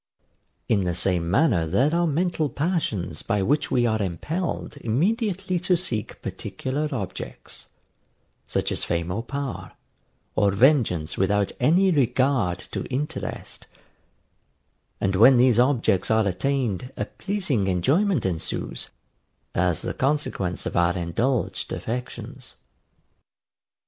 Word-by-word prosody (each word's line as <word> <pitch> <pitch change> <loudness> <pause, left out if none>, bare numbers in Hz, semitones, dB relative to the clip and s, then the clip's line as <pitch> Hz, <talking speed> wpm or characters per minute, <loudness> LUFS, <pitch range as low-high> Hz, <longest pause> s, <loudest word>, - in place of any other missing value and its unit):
In 100 -4 +2
the 90 -1 -1
same 90 -1 +1
manner 100 - +3
there 125 - +2
are 170 0 +2
mental 160 0 0
passions 125 - -2
by 105 -4 0
which 145 +8 +1
we 120 -1 +2
are 110 -2 +1
impelled 150 - -3
immediately 185 - 0
to 175 +1 +2
seek 110 - -3
particular 145 +4 -3
objects, 95 - -6 0.8
such - - -1
as - - -2
fame 85 0 -1
or 105 +5 -2
power, 140 +1 -5 0.6
or 100 - +4
vengeance 100 - +2
without 100 +1 +2
any 180 +9 +4
regard 130 - +2
to - - -3
interest; 150 +5 -4 1.3
and 95 0 0
when 120 +6 +7
these 120 -2 +5
objects 120 -7 +2
are 110 -2 +3
attained 125 +3 -1
a - - -1
pleasing 180 - -1
enjoyment 140 - +2
ensues, 80 -8 -3 0.6
as 90 -2 +1
the - - -2
consequence 135 -10 -1
of - - -3
our 85 +1 +2
indulged 100 +7 -1
affections. 125 +2 -6
120 Hz, 120 wpm, -24 LUFS, 95-150 Hz, 1.3 s, when